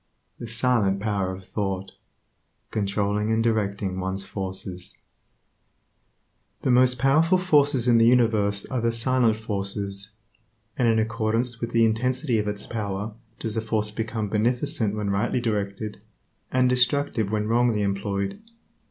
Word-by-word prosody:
The 120 - -6
silent 115 -4 +2
power 100 -3 -1
of 95 0 -9
thought: 95 -2 -3 0.8
controlling 105 +1 0
and 110 0 +2
directing 100 -4 -1
one's 95 +1 -2
forces 95 -2 -4 1.7
The 130 - +2
most 125 0 +4
powerful 155 +8 +3
forces 145 -8 +3
in 120 -1 +5
the 115 - +5
universe 110 -5 +3
are 130 -2 -3
the 115 0 +1
silent 115 -1 +3
forces; 100 -1 -3 0.6
and 125 - +1
in 115 -1 +3
accordance 115 +2 -1
with 115 - -2
the 115 -1 +3
intensity 125 +2 0
of 105 - -2
its 105 0 -2
power 105 -1 -4 0.2
does 110 -1 -3
a 110 - 0
force 110 -1 -1
become 110 0 -3
beneficent 110 0 0
when 105 -2 -2
rightly 105 +5 0
directed, 105 -2 -3 0.5
and 130 0 +3
destructive 125 -3 +1
when 105 -1 -1
wrongly 115 -2 +2
employed. 100 - -2
110 Hz, 135 wpm, -25 LUFS, 100-120 Hz, 1.7 s, in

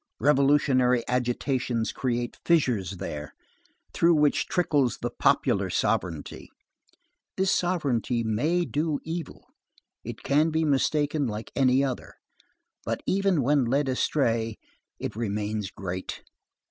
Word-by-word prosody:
Revolutionary 135 -2 +3
agitations 125 -1 -1
create 120 -2 -2
fissures 120 - +1
there, 75 -3 -6 0.6
through 170 0 +4
which 150 -1 +2
trickles 145 - +1
the - - -1
popular - - +2
sovereignty. 85 -5 -2 0.9
This 190 0 +2
sovereignty 135 -9 0
may 150 +11 +1
do 150 -1 -1
evil; 165 -2 -6 0.6
it - - -8
can 150 +3 +3
be 160 0 0
mistaken 145 0 +1
like 105 0 -5
any 130 0 +3
other; 130 -3 -4 0.7
but, - - -3
even 195 -6 +2
when 140 +1 +3
led 135 +4 +1
astray, 115 -4 0 0.4
it - - -5
remains 105 -2 -2
great. 95 -1 -6
130 Hz, 110 wpm, -26 LUFS, 115-150 Hz, 0.9 s, through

